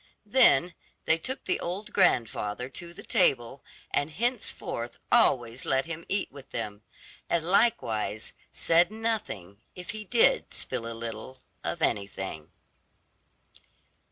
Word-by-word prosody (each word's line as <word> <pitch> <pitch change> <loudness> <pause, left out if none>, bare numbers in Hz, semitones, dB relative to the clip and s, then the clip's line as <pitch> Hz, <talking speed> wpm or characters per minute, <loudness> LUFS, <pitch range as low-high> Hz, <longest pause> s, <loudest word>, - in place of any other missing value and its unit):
Then 205 - +5 0.3
they 160 - +4
took 260 +10 -5
the - - 0
old 185 +5 -5
grandfather 120 - +2
to 170 +5 -7
the 170 - -11
table, 125 +1 +2 0.3
and 145 - +1
henceforth 200 - -3
always 120 -1 +3
let 135 0 +1
him 165 0 -6
eat 195 0 -1
with 140 -2 -12
them, 105 0 -4 0.5
and 170 -2 +2
likewise 165 - +1 0.2
said 170 +1 +4
nothing 215 - -3
if 180 -1 -6
he 215 0 -6
did 230 +3 +3
spill 115 -2 -3
a - - -6
little 115 +3 -7 0.2
of - - -2
anything. 95 -6 -2
140 Hz, 125 wpm, -28 LUFS, -, 0.5 s, Then